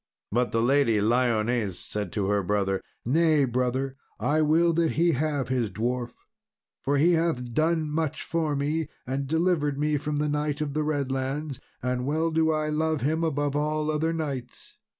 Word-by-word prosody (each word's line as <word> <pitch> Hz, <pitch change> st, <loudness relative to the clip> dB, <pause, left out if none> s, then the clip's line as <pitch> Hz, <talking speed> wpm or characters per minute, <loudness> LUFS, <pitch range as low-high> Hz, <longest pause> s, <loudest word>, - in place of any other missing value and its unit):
But 120 Hz, +3 st, +1 dB
the 115 Hz, 0 st, +1 dB
Lady 125 Hz, -4 st, +3 dB
Lyones 115 Hz, -2 st, +1 dB
said 105 Hz, -4 st, -5 dB
to 105 Hz, -2 st, 0 dB
her 100 Hz, +1 st, +2 dB
brother, 95 Hz, 0 st, 0 dB, 0.2 s
"Nay 155 Hz, +2 st, +3 dB
brother, 130 Hz, +2 st, -1 dB, 0.2 s
but -, -, -4 dB
I 155 Hz, +2 st, +3 dB
will 165 Hz, +3 st, +4 dB
that 165 Hz, -1 st, +1 dB
he 170 Hz, +2 st, +3 dB
have 145 Hz, -2 st, -1 dB
his 125 Hz, -4 st, 0 dB
dwarf, 120 Hz, +4 st, -2 dB, 0.7 s
for 140 Hz, +1 st, +1 dB
he 165 Hz, +5 st, +4 dB
hath 160 Hz, -8 st, 0 dB
done 160 Hz, +1 st, +1 dB
much 155 Hz, 0 st, -2 dB
for 160 Hz, -3 st, -1 dB
me, 150 Hz, +2 st, -1 dB, 0.2 s
and 135 Hz, +2 st, -2 dB
delivered 160 Hz, -2 st, +1 dB
me 150 Hz, +1 st, +1 dB
from 150 Hz, +1 st, -3 dB
the 150 Hz, +1 st, 0 dB
Knight 150 Hz, 0 st, -1 dB
of 150 Hz, -2 st, -2 dB
the 155 Hz, -, 0 dB
Redlands, 140 Hz, -1 st, -2 dB, 0.2 s
and 125 Hz, 0 st, -1 dB
well 160 Hz, +3 st, +1 dB
do 160 Hz, 0 st, +2 dB
I 155 Hz, -1 st, 0 dB
love 155 Hz, 0 st, 0 dB
him 160 Hz, +4 st, 0 dB
above 145 Hz, -2 st, 0 dB
all 150 Hz, +1 st, 0 dB
other 155 Hz, +2 st, 0 dB
knights." 140 Hz, -7 st, -5 dB
145 Hz, 175 wpm, -26 LUFS, 125-155 Hz, 0.7 s, will